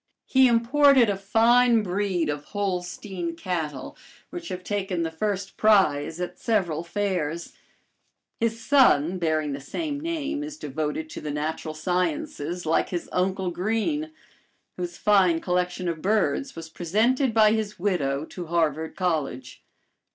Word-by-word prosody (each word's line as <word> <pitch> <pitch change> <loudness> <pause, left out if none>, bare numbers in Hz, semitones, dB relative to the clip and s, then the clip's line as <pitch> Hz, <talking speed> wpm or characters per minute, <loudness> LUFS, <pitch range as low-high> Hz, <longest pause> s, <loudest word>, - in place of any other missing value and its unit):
He 265 -1 +5
imported 245 0 +5
a - - -1
fine 230 +3 +4
breed 185 -3 -1
of 145 0 -3
Holstein 180 -3 -3
cattle, 160 -6 -4 0.4
which 345 -1 -7
have 180 0 -5
taken 190 -3 -2
the 165 - -2
first 195 +3 -3
prize 170 -7 +3
at 180 - -5
several 180 -8 0
fairs. 170 -4 -2 0.9
His 230 0 0
son, 185 - +4
bearing 155 -3 0
the 140 - -6
same 290 - -4
name, 305 -2 -3
is 300 0 -7
devoted 155 - -3
to - - -7
the 150 - -5
natural 155 +1 -3
sciences, 175 0 -2
like 160 - +1
his 175 -2 -4
uncle 185 0 0
Greene; 225 - -1 0.6
whose 175 -1 -5
fine 190 -5 +4
collection 180 +1 -1
of 165 -2 -3
birds 210 - 0
was 165 -1 -7
presented 220 - +1
by 215 -1 +5
his 215 -1 -2
widow 155 -7 0
to 175 0 -8
Harvard 160 -1 0
College. 160 -8 -2
180 Hz, 135 wpm, -25 LUFS, 160-220 Hz, 0.9 s, He